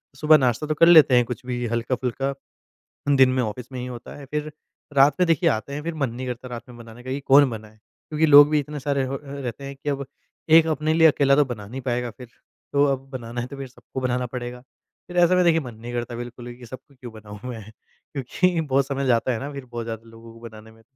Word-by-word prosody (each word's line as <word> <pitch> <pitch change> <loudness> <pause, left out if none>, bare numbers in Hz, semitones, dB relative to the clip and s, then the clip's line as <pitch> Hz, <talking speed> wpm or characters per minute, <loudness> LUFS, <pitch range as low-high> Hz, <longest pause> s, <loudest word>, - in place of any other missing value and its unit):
सुबह 155 +2 +5
नाश्ता 130 +2 0
तो 155 - 0
कर 165 +3 +5
लेते 155 -7 +7
हैं 120 - +4
कुछ 125 +1 -7
भी 125 -1 -3
हल्का-फुल्का 125 +3 -2 0.8
दिन 130 -1 +6
में 130 0 +1
ऑफिस 115 +4 -6
में 130 - -6
ही 125 - -5
होता 120 -2 -9
है। 145 - -10
फ़िर 150 +2 -4 0.4
रात 140 +1 +5
में 180 - +4
देखिए 165 -4 +3
आते 110 +6 -3
हैं 150 - -4
फ़िर 170 +1 -3
मन 140 -5 -1
नहीं 130 +2 -6
करता 125 0 -6
रात 120 -2 -7
में 120 - -12
बनाने 115 +1 -13
का 130 - -6
कि 135 - -2
कौन 140 0 +5
बनाए? 110 -2 -9
क्योंकि 150 +8 -3
लोग 145 -1 +8
भी 150 -1 +2
इतने 145 +1 -5
सारे 140 0 -1
हो 135 +1 -4
अ, - - -6
रहते 140 -1 -6
हैं 140 0 -7
कि 140 +2 -5
अब 140 -1 -2 0.4
एक 160 0 +7
अपने 155 0 0
लिए 160 0 +6
अकेला 140 -2 +3
तो 145 0 +4
बना 110 -6 -7
नहीं 130 +5 -7
पाएगा 125 -1 -2
फ़िर। 125 +4 -12 0.5
तो 140 0 +4
अब 135 0 -7
बनाना 120 -2 -5
है 120 - -5
तो 140 - -9
फ़िर 135 -1 -6
सबको 130 +1 -9
बनाना 125 0 -1
पड़ेगा, 125 0 -6
फ़िर 175 +6 -14
ऐसा 180 +1 +4
मैं 180 - +4
देखिए 165 -1 +4
मन 125 -5 -9
नहीं 120 +2 -9
करता 120 0 -4
बिल्कुल 120 0 -8
भी 120 - -8
कि 125 - -12
सबका 130 +4 -12
क्यों 125 -2 -10
बनाऊँ 105 -1 -11
मैं 115 -3 -6 0.5
क्योंकि 165 +6 0
बहुत 140 -3 +1
समय 140 -1 -2
जाता 125 +1 +2
है 115 - -3
ना 140 +4 -6
फ़िर 140 -2 -8
बहुत 120 -1 -6
ज़्यादा 115 0 -7
लोगों 115 0 -14
को 115 - -15
बनाने 110 -1 -12
में। 115 0 -21
130 Hz, 255 wpm, -23 LUFS, 120-140 Hz, 0.8 s, लोग